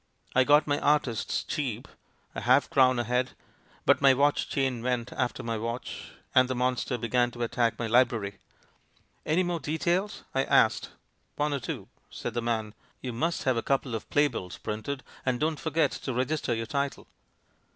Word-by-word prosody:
I 130 - +6
got 145 +2 +5
my 145 -1 0
'artists' 140 -6 +1
cheap 125 -7 -3 0.2
— - - -39
a - - -4
half 130 +3 +3
crown 130 -2 +5
a 120 - +1
head, 125 +2 0 0.5
but - - +4
my 135 -1 +6
watch 145 +2 +2
chain 130 -4 0
went 125 0 -1
after 125 -2 -2
my 115 -2 -2
watch, 115 +2 -5 0.2
and 130 -1 +6
the 130 - -1
monster 125 0 0
began 120 +1 +1
to 120 0 -5
attack 115 0 0
my 120 - -2
library. 115 -4 +2 0.9
'Any 165 +4 +3
more 175 -1 -1
"details"?' 170 +7 -1
I 135 - +2
asked. - - +3 0.5
'One 150 0 0
or 140 - -1
two,' 120 - -5 0.2
said 120 - -5
the 120 - -1
man; 110 -2 -2 0.3
'you 125 -2 -4
must 165 +9 -1
have 130 -3 +2
a - - +1
couple 135 -1 0
of 110 - -5
playbills 145 -11 0
print 105 0 -5
FRANKENSTEIN 140 -2 -4
II - - -21
5^ - - -23
ed, - - 0
and 125 -1 0
don't 155 -1 0
forget 160 -3 +1
to 130 - -4
register 130 -1 0
your 115 0 -3
title.' 140 +3 -2
130 Hz, 195 wpm, -28 LUFS, 120-145 Hz, 0.9 s, I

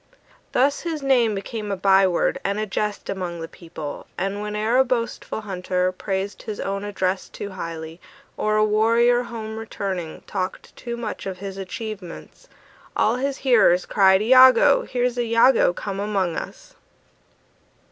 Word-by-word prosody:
Thus 280 +3 +2
his 320 -4 -4
name 245 -6 +3
became 210 +1 -5
a - - 0
by 195 0 +5
word 175 - 0
And 200 +1 -1
a 215 - -1
jest 210 +1 -3
among 180 -3 -4
the 165 - -5
people; 160 -4 -8
And 195 +1 -2
whene'er 210 +3 0
a 265 - +6
boastful 235 -3 -3
hunter 185 -2 -1
Praised 195 +1 -4
his 215 -2 -6
own 195 +1 -3
address 190 -2 -2
too 200 - -7
highly, 165 -2 -7 0.3
Or 215 0 0
a 215 0 +4
warrior, 230 +3 +3
home 225 -2 -6
returning, 190 -6 -5
Talked 185 0 -5
too 235 -1 -6
much 225 -4 -5
of 190 -1 -5
his 195 0 -7
achievements, 195 -2 -8 0.5
All 225 +3 +2
his 275 +1 -2
hearers 215 -8 +5
cried: 190 -1 +4
"Iagoo! 255 +3 +6
Here's 245 -1 -1
Iagoo 230 -3 +4
come 195 -1 -5
among 195 -5 -1
us!" - - -8
210 Hz, 150 wpm, -23 LUFS, 190-235 Hz, 0.5 s, a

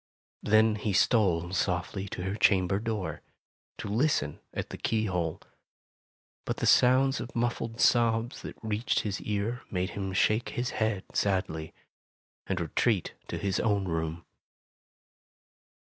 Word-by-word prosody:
Then 110 0 +4
he 105 -1 -2
stole 95 -5 +2
softly 95 +1 -1
to 90 - -5
her 95 +1 -2
chamber 95 -2 +3
door, 110 -4 -3 0.6
to - - -5
listen 125 +9 +1
at - - -4
the - - -6
keyhole. 90 -7 -1 1.0
But - - -3
the - - -1
sounds 130 +2 +5
of 120 +1 -7
muffled 115 -1 -1
sobs 115 0 +3
that - - -8
reached 110 +2 0
his 105 -2 -3
ear 105 +4 -2
made 90 +1 -2
him 95 -1 -4
shake 110 +4 +2
his 120 +1 -1
head 110 -4 -1
sadly, 95 -5 -1 0.7
and 95 -2 -1
retreat 90 +4 0
to - - -4
his 100 -2 -1
own 100 -3 +1
room. 80 0 -3
105 Hz, 135 wpm, -29 LUFS, 95-115 Hz, 1.0 s, sounds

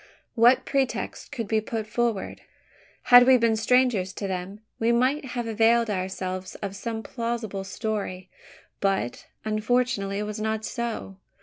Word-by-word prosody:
What 240 +2 +5
pretext 270 -2 -2
could 230 -4 -4
be 220 +1 +1
put 220 0 -4
forward? 230 -2 -2 0.7
Had 245 0 +10
we 260 -1 +7
been 230 -2 +2
strangers 225 -4 +2
to 200 - -4
them, 190 +2 -5 0.2
we 230 +1 +2
might 260 +5 +2
have 240 -1 -2
availed 225 0 +3
ourselves 185 -1 -4
of 200 -1 -5
some 225 +1 -4
plausible 230 -5 -3
story; 195 -3 -4 0.5
but, 195 -11 -1 0.2
unfortunately, 215 -2 0
it 210 - -1
was 210 +1 -5
not 220 0 -1
so. 235 -5 -4
220 Hz, 140 wpm, -26 LUFS, 195-235 Hz, 0.7 s, Had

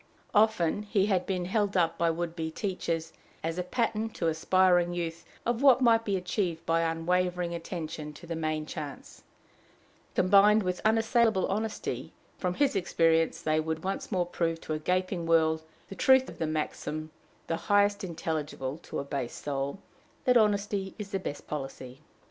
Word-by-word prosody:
Often 210 -4 +3
had 205 -1 +1
he - - -16
been 185 -2 -1
held 200 +1 0
up 170 -2 +1
by 170 - +3
would 170 0 -2
be 160 -1 -3
teachers 165 -3 -3 0.3
as 165 +2 -2
a - - 0
pattern 225 +2 -1
to 165 - +1
aspiring 175 +1 +3
youth 170 -1 -4 0.2
of 240 +1 0
what 270 -3 +7
might 230 -3 +4
be 200 -2 +1
achieved 180 -2 -2
by 165 0 +2
unwavering 175 +2 0
attention 160 -3 -5
to 160 - -12
the 170 0 -4
main 155 -1 -2
chance, 150 -3 -8 0.9
combined 205 +3 +5
with 180 -1 -2
unassailable 225 -2 +3
honesty: 215 +2 -3 0.3
from 180 -1 -1
his 285 -5 +2
experience 165 -3 +2
they 155 0 +2
would 160 0 -3
once 195 +3 -3
more 180 -3 +1
prove 165 -1 -1
to 155 - -4
a 155 - -2
gaping 180 +1 -1
world 160 -1 +3 0.3
the - - -8
truth 260 +3 +5
of - - -11
the 160 - 0
maxim, 155 0 -3 0.3
the 165 - -1
highest 205 +3 +2
intelligible 155 -5 -3
to - - -7
a - - -2
base 140 -4 -4
soul, 140 +2 -3 0.5
that 250 - +4
"honesty 205 -3 +2
is 205 -2 -7
the 195 - -1
best 145 -5 -6
policy." 135 -2 -6
175 Hz, 165 wpm, -29 LUFS, 160-200 Hz, 0.9 s, what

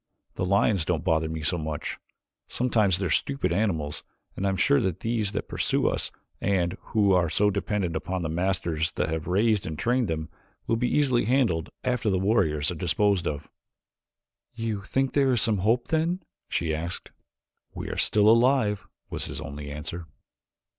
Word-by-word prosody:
The - - -2
lions 100 -1 +3
don't 80 -2 -1
bother 80 0 +1
me 80 -1 -4
so 85 +3 0
much. 75 -1 -4 0.5
Sometimes 110 -7 +2
they 95 - -2
are 85 - -1
stupid 140 -1 0
animals, 85 -7 -1 0.3
and 100 - -1
I - - +3
am 95 - 0
sure 140 +7 +4
that 95 -4 -2
these 110 -3 0
that - - -3
pursue - - 0
us, - - 0 0.3
and 95 -2 +1
who 105 -3 +2
are 90 -3 +3
so 105 +6 +2
dependent 100 -3 -1
upon 90 +3 -2
the - - -1
masters 85 -2 0
that - - -1
have 80 0 -3
raised 105 +2 +2
and 80 -1 -4
trained 120 +3 +1
them, 80 -2 -3 0.4
will 115 - +1
be 125 +2 0
easily 130 -7 +2
handled 110 - +1
after 125 -3 0
the 95 - +2
warriors 90 -7 +1
are 85 - -7
disposed 95 0 +2
of." 75 -1 -4 1.0
"You 110 -3 -2
think 135 +6 -1
there 135 -2 +3
is 120 - +2
some 110 -4 +2
hope, 115 +5 +1
then?" 165 +3 0 0.3
she 80 -2 0
asked. 85 +3 -4 0.6
"We - - -5
are - - -4
still 105 0 +3
alive," 115 -2 +4 0.2
was - - -3
his - - -6
only 75 +1 -7
answer. 80 +3 -6
95 Hz, 180 wpm, -26 LUFS, 80-115 Hz, 1.0 s, sure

